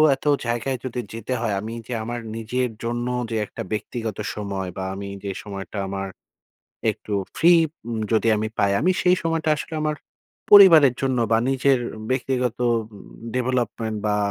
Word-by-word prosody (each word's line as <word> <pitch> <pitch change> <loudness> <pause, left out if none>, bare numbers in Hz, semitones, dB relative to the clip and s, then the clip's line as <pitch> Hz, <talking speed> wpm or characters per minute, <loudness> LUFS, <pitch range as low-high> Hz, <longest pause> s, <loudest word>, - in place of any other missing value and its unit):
এত - - -18 0.2
জায়গায় 120 +3 -1
যদি 125 -1 -3
যেতে 115 +3 -4
হয়, 115 -3 0
আমি 110 +2 -6
যে 125 - -4
আমার 120 +2 -4 0.2
নিজের 125 +3 -1
জন্য 120 +1 -2 0.2
যে - - -1
একটা - - -8
ব্যক্তিগত 110 0 -4 0.2
সময় 100 -3 -4
বা, 95 - -3
আমি 100 0 -6
যে 100 - -3
সময়টা 100 0 -7
আমার 95 0 -3 0.8
একটু 105 - -7 0.2
ফ্রি 175 +2 +6 0.4
উম 115 -1 -2
যদি 110 0 +2
আমি 110 +1 -1
পাই, 100 - +3
আমি 185 - +4
সেই 180 0 +4
সময়টা 165 -1 0
আসলে 150 - -6
আমার 155 0 0 0.6
পরিবারের 165 -10 +9
জন্য 130 -2 +1
বা, 110 - +5
নিজের 135 0 +3 0.3
ব্যক্তিগত 125 -2 0
উম 115 -1 +2 0.5
ডেভেলপমেন্ট 120 -3 -1
বা, 105 - +2
120 Hz, 160 wpm, -23 LUFS, 110-130 Hz, 0.8 s, পরিবারের